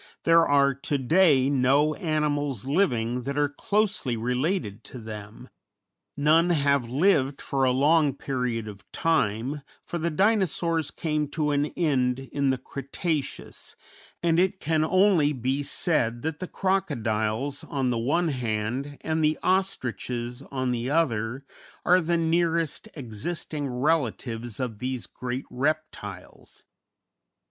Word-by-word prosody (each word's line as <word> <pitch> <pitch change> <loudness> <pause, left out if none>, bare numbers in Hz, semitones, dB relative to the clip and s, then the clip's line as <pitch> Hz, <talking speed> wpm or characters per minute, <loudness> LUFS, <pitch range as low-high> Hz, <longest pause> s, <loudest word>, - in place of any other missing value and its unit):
There 165 0 +5
are 140 -1 +4
to 140 +2 -2
day 140 -1 +4
no 140 +3 +3
animals 145 - -1
living 125 - +1
that 140 +3 -4
are 145 0 +3
closely 205 - 0
related 125 - -1
to 130 - -10
them; 110 +1 -9 0.7
none 160 +4 +4
have 140 -6 +2
lived 140 -1 +2
for 135 -1 0
a 130 - +3
long 145 +2 +3
period 125 -5 -2
of 100 -2 -9
time, 140 -3 0 0.2
for 170 - -4
the 170 +1 0
Dinosaurs 170 -4 +1
came 150 -2 -2
to 150 0 -1
an 145 +1 +1
end 130 -7 +2
in 135 +1 -1
the 130 - +1
Cretaceous, 140 +4 -4 0.5
and 165 -1 +3
it 190 +1 +1
can 155 0 +1
only 185 -4 +4
be 130 +2 -1
said 120 -6 0
that 160 -1 -3
the 185 - -4
crocodiles, 135 - -1
on 135 -3 -1
the 115 - 0
one 160 +8 +1
hand, 125 +2 -2
and 160 0 -1
the 155 0 +2
ostriches, 125 -9 -1
on 130 -2 -1
the 120 +1 -2
other, 130 -4 0 0.4
are 180 +1 +5
the 170 +1 +1
nearest 165 +1 0
existing 145 +4 -4
relatives 125 -4 -1
of 120 -5 -3
these 130 0 -3
great 125 +2 -5
reptiles. 135 -9 -4
140 Hz, 130 wpm, -26 LUFS, 125-160 Hz, 0.7 s, There